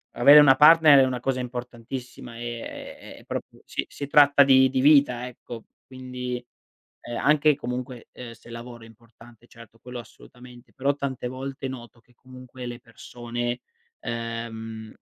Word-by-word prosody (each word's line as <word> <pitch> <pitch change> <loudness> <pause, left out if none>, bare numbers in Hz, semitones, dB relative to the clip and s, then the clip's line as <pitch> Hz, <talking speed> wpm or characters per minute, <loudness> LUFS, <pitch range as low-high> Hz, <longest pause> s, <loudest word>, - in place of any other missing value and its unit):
Avere 140 +5 +8
una 140 -3 +7
partner 150 0 +7
è - - +6
una 130 -1 -3
cosa 130 +1 -2
importantissima 125 0 -8
e 120 -1 -7 0.2
è - - -16
proprio - - -7
si - - -4
si 140 - -7
tratta 145 0 +6
di 130 -1 +5
di 130 0 -1
vita, 140 -4 +4
ecco. 120 -2 -11 0.2
Quindi, 125 -1 -7 0.6
ehm, 120 - -6
anche 150 0 +3
comunque, 125 -2 -6
ehm, 125 -2 -9
se 115 - -18
lavoro 120 0 -10
è - - -13
importante 115 +1 -19
certo, 115 -2 -16
quello 125 +1 -9
assolutamente, 125 +1 -15
però 140 +2 -1
tante 135 -3 -4
volte 135 +2 -6
noto 120 -2 -10
che 125 +2 -29
comunque 130 0 -12
le 120 0 -7
persone, 120 0 -6 0.4
ehm, 115 -1 -6
125 Hz, 150 wpm, -24 LUFS, 120-135 Hz, 0.6 s, Avere